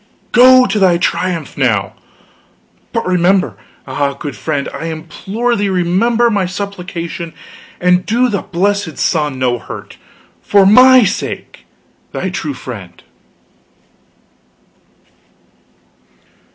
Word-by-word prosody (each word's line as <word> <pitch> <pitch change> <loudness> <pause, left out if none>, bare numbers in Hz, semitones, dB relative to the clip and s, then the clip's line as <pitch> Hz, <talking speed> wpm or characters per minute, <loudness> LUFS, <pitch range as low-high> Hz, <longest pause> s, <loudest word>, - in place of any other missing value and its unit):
Go 255 +1 +7
to 210 0 -1
thy 185 -3 +4
triumph, 170 -3 -2
now! 105 -8 0 1.0
But - - -2
remember 185 +1 +2 0.3
ah, 140 -1 -1
good 140 -2 -6
friend, 140 +5 -3
I - - -6
implore 190 +9 -3
thee 205 -2 -1
remember 210 +7 +2
my 200 -3 0
supplication, 180 -3 -6 0.4
and 180 0 +3
do 240 +5 +1
the 200 -6 -2
blessed 200 -1 -1
sun 150 -5 0
no 125 -2 0
hurt. - - -10 0.4
For 200 -1 +4
my 255 +5 +7
sake, 190 - -4 0.5
thy 190 - -3
true 150 -6 -4
friend." 100 -9 -9
180 Hz, 105 wpm, -15 LUFS, 155-205 Hz, 1.0 s, Go